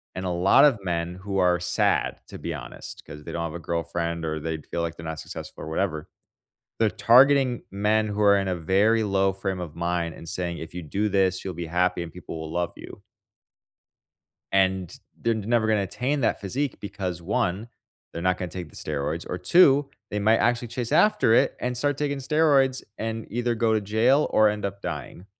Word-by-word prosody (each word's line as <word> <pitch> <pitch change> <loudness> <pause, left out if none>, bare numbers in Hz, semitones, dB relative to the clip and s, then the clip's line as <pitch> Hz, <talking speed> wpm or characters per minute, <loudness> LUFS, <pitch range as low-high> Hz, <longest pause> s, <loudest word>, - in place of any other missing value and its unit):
and 95 - -4
a 90 - -1
lot 90 +9 +5
of 130 -8 +3
men 85 -1 -2
who 95 +1 -4
are 90 -1 +3
sad, 90 0 0
to - - -9
be 85 - -4
honest, 65 -5 -9
'cause 75 0 -10
they - - -7
don't 85 - -2
have 80 - -4
a 85 - -5
girlfriend, 85 0 -3
or 80 0 -2
they'd 80 0 -4
feel 85 - -3
like 85 0 -3
they're 80 - -9
not 80 -1 -5
successful, - - -8
or - - -7
whatever. 80 -3 -2 0.7
They're 110 -2 +3
targeting 130 +2 +5
men 105 +2 +1
who 105 +1 -3
are 100 -1 +6
in 95 - -1
a 90 - 0
very 100 +7 +2
low 95 -1 +2
frame 95 -1 -3
of 80 -3 -6
mind 85 -1 -1
and 85 - -11
saying, 85 -1 -3
"If 80 +1 -9
you 90 - -5
do 100 +7 -1
this, 95 -2 +1
you'll 95 -3 -4
be 85 0 -5
happy 90 +1 +1
and 85 -1 -8
people 85 -2 -8
will 80 0 -6
love 85 0 -1
you." - - -11 1.5
And 95 -2 +1 0.3
they're 115 - +1
n 110 - -3
never 115 -1 +2
gonna 110 -2 +2
attain 135 +8 -2
that 115 - +1
physique 130 +8 -3
because, 95 -4 -4
1, 95 +3 -1 0.4
they're 85 - -5
not 90 0 +1
gonna 90 -2 -4
take 85 -3 -7
the - - -16
steroids, 75 +2 -3
or, 90 - -3
2, 140 - +5 0.2
they 105 - -2
might 110 +2 +4
actually 120 0 +1
chase 120 0 -4
after 210 - +4
it - - +3
and 125 0 -2
start 145 +3 0
taking 145 -1 -1
steroids 135 -2 +2 0.2
and 110 0 -4
either 120 0 0
go 115 0 +1
to 110 - +2
jail 115 +8 +2
or 110 -1 +5
end 105 0 -3
up 100 0 -4
dying. 85 +2 -6
95 Hz, 210 wpm, -25 LUFS, 85-115 Hz, 1.5 s, are